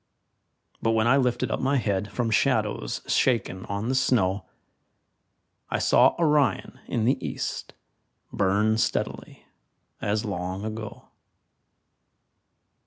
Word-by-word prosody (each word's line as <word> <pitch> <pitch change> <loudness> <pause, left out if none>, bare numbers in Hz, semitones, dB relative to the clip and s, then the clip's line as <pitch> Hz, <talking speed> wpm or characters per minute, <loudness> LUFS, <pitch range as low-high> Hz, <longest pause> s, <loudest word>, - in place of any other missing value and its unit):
But 115 - +1
when 110 0 +2
I 125 +4 +5
lifted 125 -2 0
up - - -1
my 140 +2 +1
head 100 -4 -1
From 120 -2 -1
shadows - - 0
shaken 110 -7 0
on 100 +2 -3
the 130 - 0
snow, 100 -7 +1 1.2
I - - 0
saw - - +4
Orion 150 -4 +1
in 115 -2 -1
the 130 +2 +1
east - - -4 0.6
Burn 105 +3 +2
steadily - - -2 0.6
as 105 +1 -1
long 95 0 -4
ago. 110 -1 -7
110 Hz, 110 wpm, -26 LUFS, 100-125 Hz, 1.2 s, I